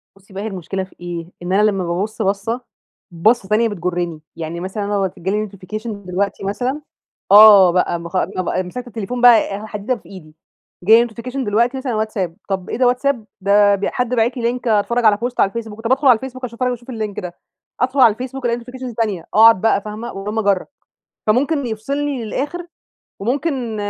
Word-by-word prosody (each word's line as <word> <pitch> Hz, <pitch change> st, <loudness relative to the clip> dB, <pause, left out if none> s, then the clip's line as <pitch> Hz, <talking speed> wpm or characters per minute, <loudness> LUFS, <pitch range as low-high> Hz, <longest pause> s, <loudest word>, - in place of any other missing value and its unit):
بُصي 195 Hz, 0 st, -20 dB
بقى 195 Hz, +1 st, -5 dB
هي -, -, -3 dB
المشكلة 190 Hz, -1 st, -4 dB
في 185 Hz, -, -14 dB
إيه؟ 175 Hz, 0 st, -6 dB
إن 180 Hz, +2 st, -2 dB
أنا 200 Hz, -, +4 dB
لمّا 195 Hz, -2 st, -2 dB
بابص 190 Hz, +6 st, -3 dB
بصّة، 205 Hz, +4 st, -1 dB, 0.5 s
بصّة 195 Hz, +5 st, +2 dB
تانية 220 Hz, +2 st, +3 dB
بتجرني. 175 Hz, -4 st, -3 dB
يعني 165 Hz, +1 st, -5 dB
مثلًا 190 Hz, +3 st, -4 dB
أنا 205 Hz, +1 st, -1 dB
أهوَّة 195 Hz, -2 st, 0 dB
جالي 210 Hz, +4 st, -2 dB
notification 205 Hz, +4 st, -7 dB
دلوقتي 200 Hz, -1 st, -3 dB
مثلًا 250 Hz, +9 st, -2 dB, 0.5 s
آه 205 Hz, -3 st, +9 dB
بقى 170 Hz, -1 st, 0 dB
بخ 170 Hz, +2 st, -4 dB
بابقى 185 Hz, 0 st, -2 dB
مسكت 245 Hz, +8 st, -7 dB
التليفون 235 Hz, +2 st, -5 dB
بقى 245 Hz, -2 st, +8 dB, 0.2 s
آآ 210 Hz, +2 st, -7 dB
حديدة 210 Hz, +4 st, -3 dB
في 230 Hz, -, -16 dB
إيدي. 165 Hz, -6 st, -12 dB, 0.5 s
جالي 225 Hz, +5 st, +6 dB
notification 245 Hz, +4 st, -7 dB
دلوقتي 235 Hz, +5 st, +1 dB
مثلًا 260 Hz, -1 st, -3 dB
على 215 Hz, -, -1 dB
واتساب، 195 Hz, -6 st, -3 dB
طب 190 Hz, -2 st, -3 dB
إيه -, -, -3 dB
ده 250 Hz, 0 st, +3 dB
واتساب، 250 Hz, -2 st, 0 dB, 0.2 s
ده 205 Hz, +1 st, +4 dB
ب 200 Hz, 0 st, -3 dB
حد 250 Hz, -3 st, -1 dB
باعت 235 Hz, +3 st, +1 dB
لي 235 Hz, 0 st, 0 dB
link 245 Hz, -, -7 dB
أتفرّج 230 Hz, +2 st, +1 dB
على 210 Hz, -1 st, +5 dB
بوست 245 Hz, +3 st, -4 dB
على -, -, +5 dB
الفيسبوك، 225 Hz, 0 st, -7 dB
طب 230 Hz, -, -2 dB
أدخل 275 Hz, +2 st, +3 dB
على 250 Hz, -, +8 dB
الفيسبوك 255 Hz, +2 st, -8 dB
أشوف 235 Hz, 0 st, -7 dB
أنا 250 Hz, -, +2 dB
وأشوف 245 Hz, +1 st, -7 dB
الlink 215 Hz, -4 st, -4 dB
ده. 175 Hz, -1 st, -7 dB, 0.5 s
أدخل 260 Hz, +2 st, +1 dB
على 235 Hz, -4 st, +7 dB
الفيسبوك 255 Hz, +3 st, -6 dB
ألاقي 235 Hz, 0 st, 0 dB
notifications 250 Hz, 0 st, -8 dB
تانية، 210 Hz, -7 st, -1 dB
أقعد 225 Hz, -2 st, +7 dB
بقى 220 Hz, -3 st, +2 dB
فاهمة؟ 215 Hz, +3 st, -6 dB
وهلم 210 Hz, +3 st, -3 dB
جرا، 200 Hz, -3 st, +1 dB, 0.6 s
فممكن 275 Hz, +5 st, +2 dB
يفصلني 270 Hz, +3 st, -3 dB
للآخر 295 Hz, +10 st, -4 dB, 0.5 s
وممكن 250 Hz, 0 st, -2 dB
215 Hz, 195 wpm, -19 LUFS, 195-245 Hz, 0.6 s, آه